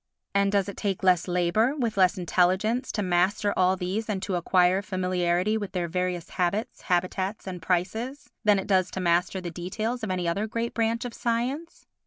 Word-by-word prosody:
And 200 0 +3
does 200 -1 +2
it 200 - -7
take 195 -3 -2
less 180 -2 +3
labour, 180 +9 +2
with 235 -5 -1
less 190 0 +4
intelligence, 190 +8 +1
to 210 - -1
master 185 +3 +1
all 185 0 +3
these 190 +5 -3
and 200 -3 -1
to 195 - -2
acquire 180 +1 +3
familiarity 185 +1 0
with 205 -2 -6
their 175 -2 -1
various 180 0 -2
habits, 195 +5 -1
habitats 185 +3 -1
and 180 -2 -6
prices 210 - -2 0.2
than 210 -2 +5
it 195 - -2
does 185 -2 +2
to - - -5
master 180 +1 +1
the 175 -2 -5
details 215 +8 -3
of 215 - -2
any 180 -2 -1
other 200 +6 0
great 230 +2 -3
branch 230 +1 0
of 245 - -5
science? 250 +8 -2
190 Hz, 190 wpm, -26 LUFS, 180-215 Hz, 0.2 s, than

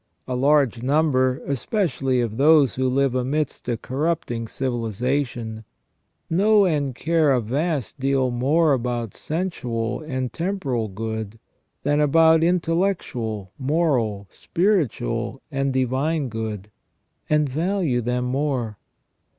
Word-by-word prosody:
A 130 - -2
large 135 -3 +3
number, 130 -2 +2
especially 135 - 0
of 115 -2 -3
those 145 -3 +5
who 130 0 0
live 135 0 +1
amidst 130 +2 -2
a 120 - 0
corrupting 130 -3 -2
civilization, 120 -1 -2 0.6
know 205 +4 +4
and 145 -7 0
care 160 0 +2
a 130 - +3
vast 140 +4 -2
deal 135 -1 +1
more 145 +6 +3
about 120 -3 -2
sensual 125 -9 -3
and 130 -6 -3
temporal 165 - -2
good 110 +1 -5 0.5
than 145 +1 +2
about 160 +2 +5
intellectual, 165 - 0
moral, 130 -9 0
spiritual, 170 - -1
and 135 0 0
divine 130 +3 0
good, 110 -2 -5 0.6
and 150 -1 +3
value 160 -2 0
them 125 +1 -1
more. 125 -5 -1
135 Hz, 110 wpm, -23 LUFS, 120-155 Hz, 0.6 s, those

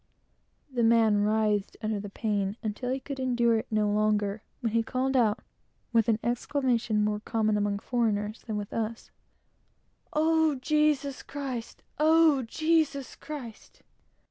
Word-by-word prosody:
The 245 - 0
man 225 -2 +4
writhed 210 -1 +1
under 215 -1 -1
the 205 0 -6
pain, 205 -1 -2
until 220 +3 -3
he 260 +1 -1
could 270 0 -7
endure 240 -3 +2
it - - -7
no 215 -1 +1
longer, 210 0 +1 0.2
when 230 -3 -1
he 230 - +3
called 260 +3 -1
out, 225 -5 +2 0.5
with 230 0 +3
an 220 - +3
exclamation 240 -3 0
more 210 0 0
common 215 0 0
among 205 -1 0
foreigners 215 -2 -1
than 215 -2 -4
with 205 -1 -5
us 225 0 -4 1.0
"Oh, 320 0 +3
Jesus 290 0 +1
Christ! 265 -5 -6 0.2
Oh, 315 -2 +5
Jesus 310 +1 0
Christ!" 260 -8 -9
230 Hz, 140 wpm, -28 LUFS, 215-270 Hz, 1.0 s, Oh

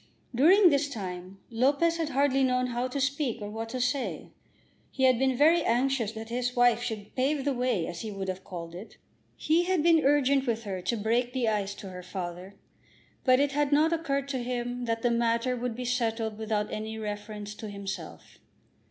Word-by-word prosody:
During 350 - +6
this 285 0 +1
time 185 -5 -6
Lopez 280 +8 +2
had 325 -2 -1
hardly 275 -1 +2
known 255 -1 +2
how 245 0 -2
to 255 +2 -4
speak 275 -3 -1
or 205 -1 -6
what 225 +1 -5
to 255 - -4
say. 250 +2 -2 0.6
He 265 - -3
had 255 -2 +5
been 265 -1 +2
very 320 +5 +5
anxious 245 -2 +1
that 220 0 -8
his 245 +1 -2
wife 245 -1 +4
should 215 -4 -5
pave 270 +2 0
the 285 - +1
way, 245 -9 0
as 170 - -6
he 220 - -5
would 195 -2 -5
have 185 0 -4
called 170 -4 -7
it. 185 +6 -10 0.4
He 335 +3 +2
had 365 -4 +1
been 330 -2 +5
urgent 275 -1 +3
with 230 -1 -1
her 190 -3 -4
to 235 +6 -1
break 235 +4 0
the 255 -3 0
ice 205 -2 -1
to 195 - -9
her 180 -1 -8
father. 180 +1 -6 0.7
But 255 -1 +5
it 285 0 +2
had 290 0 0
not 310 +3 +4
occurred 280 -4 -1
to 260 -3 -2
him 245 0 -3
that 230 -1 -2
the 240 - +3
matter 235 +1 +1
would 245 -1 -3
be 250 +1 -5
settled 225 -3 -1
without 215 -1 -2
any 220 +1 -4
reference 210 -1 -6
to 215 0 -8
himself. 200 -1 -7
245 Hz, 200 wpm, -28 LUFS, 215-270 Hz, 0.7 s, During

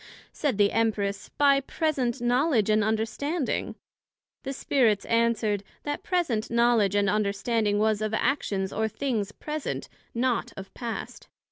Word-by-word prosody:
said 280 -9 -1
the 205 -1 +4
Empress, 205 -3 0
By 280 -1 +4
present 275 -4 -1
Knowledg 245 -3 +2
and 215 0 +3
Understanding. 225 +8 -1 0.7
The 270 - -4
Spirits 240 -6 +1
answered, 230 -3 +1 0.2
That 290 0 -3
present 325 - 0
Knowledg 235 -4 +3
and 200 -1 +2
Understanding 210 +1 +1
was 215 0 +2
of 215 -1 -1
actions 200 -8 0
or 220 +1 0
things 220 -4 -2
present, 300 +6 -5 0.3
not 245 0 0
of 195 0 -9
past. 235 -2 -6
230 Hz, 130 wpm, -27 LUFS, 210-270 Hz, 0.7 s, the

